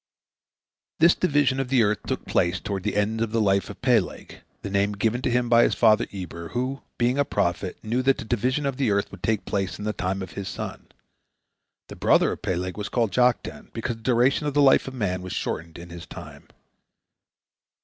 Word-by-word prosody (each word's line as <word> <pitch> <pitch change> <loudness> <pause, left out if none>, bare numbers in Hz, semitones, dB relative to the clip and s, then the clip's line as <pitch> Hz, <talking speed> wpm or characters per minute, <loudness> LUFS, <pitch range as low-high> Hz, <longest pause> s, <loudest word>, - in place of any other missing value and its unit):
This 170 +2 +6
division 145 -6 +1
of 135 - -1
the 125 -2 +3
earth 105 -2 +1
took - - -3
place 85 +2 +1
toward 100 0 -4
the - - -2
end 105 +2 0
of 115 -2 -1
the 115 - +1
life 100 -3 +2
of 100 - -11
Peleg, 120 -7 0 0.2
the - - -4
name 100 +1 +1
given 110 +4 0
to - - 0
him 120 0 +1
by 115 0 +5
his - - +3
father 110 -2 +4
Eber, 90 -3 -7
who, 130 +3 -2 0.2
being 125 +3 +1
a - - +5
prophet, 90 -6 -1
knew 115 +4 0
that 135 +1 +3
the - - -7
division 125 +6 0
of 135 -2 -2
the 135 -5 +1
earth 100 -1 0
would 95 - -11
take 110 -2 0
place 95 -2 -2
in 105 - -6
the 105 - -1
time 95 0 -2
of 95 - -8
his 100 -1 -6
son. - - -6 1.0
The - - -9
brother - - +3
of - - -6
Peleg 90 +1 -2
was 105 -1 -4
called 115 -4 0
Joktan, 125 +3 0
because 115 0 -3
the - - -18
duration 130 +5 +2
of 145 - -3
the 145 - +5
life 135 -1 +5
of 130 - -6
man 95 -6 -1
was 90 0 -6
shortened 85 0 -4
in 85 0 -10
his 85 0 -9
time. 75 -7 -11
110 Hz, 215 wpm, -25 LUFS, 95-125 Hz, 1.0 s, This